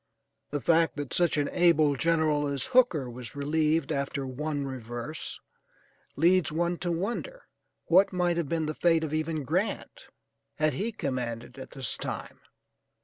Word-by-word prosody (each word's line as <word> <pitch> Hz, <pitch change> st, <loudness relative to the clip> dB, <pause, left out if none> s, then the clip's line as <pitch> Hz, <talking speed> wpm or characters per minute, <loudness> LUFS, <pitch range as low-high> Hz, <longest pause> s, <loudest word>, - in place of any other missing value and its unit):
The 145 Hz, -1 st, -3 dB
fact 165 Hz, +4 st, +3 dB
that 145 Hz, -2 st, -5 dB
such 175 Hz, -3 st, +2 dB
an 145 Hz, -1 st, +1 dB
able 160 Hz, -5 st, +4 dB
general 155 Hz, -1 st, +2 dB
as 140 Hz, -1 st, -1 dB
Hooker 235 Hz, -, +4 dB
was 120 Hz, -1 st, -8 dB
relieved 155 Hz, +1 st, +1 dB
after 140 Hz, -1 st, -2 dB
one 145 Hz, +2 st, -3 dB
reverse, 120 Hz, +2 st, -6 dB, 0.8 s
leads 175 Hz, +2 st, +3 dB
one 170 Hz, +2 st, 0 dB
to 175 Hz, -, -2 dB
wonder 240 Hz, -, -3 dB, 0.4 s
what 195 Hz, -, +5 dB
might 175 Hz, -2 st, +1 dB
have 165 Hz, -5 st, -1 dB
been 165 Hz, -1 st, 0 dB
the 155 Hz, -, -2 dB
fate 165 Hz, 0 st, +2 dB
of 155 Hz, -1 st, -3 dB
even 155 Hz, -1 st, -1 dB
Grant 190 Hz, -, -2 dB, 0.5 s
had 155 Hz, -1 st, +1 dB
he 210 Hz, -, -2 dB
commanded 125 Hz, -, -4 dB
at 130 Hz, -, -8 dB
this 135 Hz, -4 st, -2 dB
time. -, -, -6 dB
155 Hz, 150 wpm, -28 LUFS, 140-170 Hz, 0.8 s, what